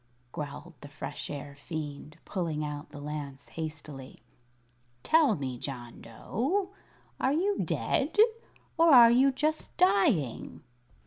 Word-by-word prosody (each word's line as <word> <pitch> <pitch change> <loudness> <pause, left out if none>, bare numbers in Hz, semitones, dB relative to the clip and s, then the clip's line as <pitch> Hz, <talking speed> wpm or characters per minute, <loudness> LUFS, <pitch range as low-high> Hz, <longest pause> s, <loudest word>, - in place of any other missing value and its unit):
growled 150 +4 -7
the 145 - -9
Fresh 145 0 -7
Air 145 -1 -7
Fiend, 150 0 -7
pulling 165 -5 -2
out 145 0 -6
the 145 -1 -10
lance 145 -2 -6
hastily. 150 -6 -8 0.8
"Tell 310 -9 +4
me, 130 -5 -4
John 120 -4 -7
Dough, 275 - -2 0.5
are 265 - +2
you 385 +6 +1
dead, 290 +8 -1 0.6
or 330 0 +6
are 240 -3 +9
you 265 +3 +5
just 310 +4 -2
dying?" 180 - +2
155 Hz, 120 wpm, -29 LUFS, -, 0.8 s, are